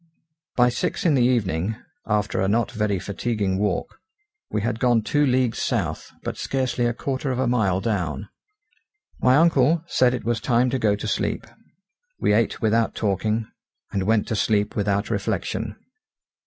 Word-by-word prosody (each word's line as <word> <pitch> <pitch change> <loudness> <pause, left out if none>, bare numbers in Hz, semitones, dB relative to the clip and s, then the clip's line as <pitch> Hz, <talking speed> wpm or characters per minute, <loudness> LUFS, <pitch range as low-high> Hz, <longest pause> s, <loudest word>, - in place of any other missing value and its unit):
By 125 0 +5
six 120 - -2
in 165 - +4
the 130 - +3
evening, 110 -5 +1 0.3
after 105 -2 0
a 95 - +2
not 115 +4 +1
very 105 -3 0
fatiguing 100 0 -2
walk, 100 -3 -2 0.5
we 105 - -2
had 115 0 -1
gone 120 -3 +3
two 145 +6 +1
leagues 125 -2 +1
south, - - -2
but - - -4
scarcely 130 -2 0
a 120 - 0
quarter 135 +1 -3
of 130 - -1
a 130 - +1
mile 110 -7 +2
down. 95 - -2 0.9
My 125 +1 +4
uncle 160 0 +4
said 125 -6 +2
it 125 - -6
was 120 0 0
time 125 0 +2
to 130 - 0
go 105 -3 +2
to 105 - -5
sleep. - - -1 0.7
We - - +2
ate 115 +1 +1
without 110 +1 +2
talking, 110 +2 0 0.5
and 95 -1 -1
went 110 -1 +2
to 110 - 0
sleep 105 0 +1
without 100 +1 0
reflection. 105 +1 -2
110 Hz, 165 wpm, -23 LUFS, 100-125 Hz, 0.9 s, By